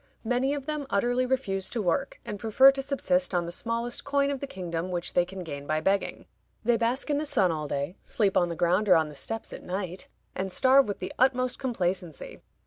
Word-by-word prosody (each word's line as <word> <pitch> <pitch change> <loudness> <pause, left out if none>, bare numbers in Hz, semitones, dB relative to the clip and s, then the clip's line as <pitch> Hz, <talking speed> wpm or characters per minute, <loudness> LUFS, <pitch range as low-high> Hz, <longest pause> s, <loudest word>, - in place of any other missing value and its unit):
Many 250 +4 +1
of 280 -2 -6
them 300 -2 -3
utterly 245 +5 +1
refuse 195 -8 0
to 240 - -3
work, 180 -5 -1
and 205 - -5
prefer 250 +5 +6
to 270 0 -3
subsist 190 -10 0
on 175 -1 +1
the 170 - -5
smallest 230 +5 -3
coin 280 0 +1
of 275 - -3
the 280 - -5
kingdom 175 -5 -4
which 175 -1 -3
they 175 - +3
can 185 0 -7
gain 145 -3 -7
by 155 0 +1
begging. 195 +5 0 0.4
They 240 +1 +3
bask 240 +6 0
in 290 - +2
the 305 - -2
sun 205 - +3
all 155 -2 -3
day, 140 +6 -3
sleep 200 -4 0
on 175 - +3
the 170 - -3
ground 180 +5 +2
or 180 - +8
on 160 -2 +2
the 150 - -11
steps 225 +9 -5
at - - -8
night, 185 0 -5 0.3
and 190 0 -3
starve 265 +5 +5
with 205 - -4
the 185 +1 -4
utmost 255 -1 +2
complacency. 185 - -3
200 Hz, 225 wpm, -27 LUFS, 180-255 Hz, 0.4 s, or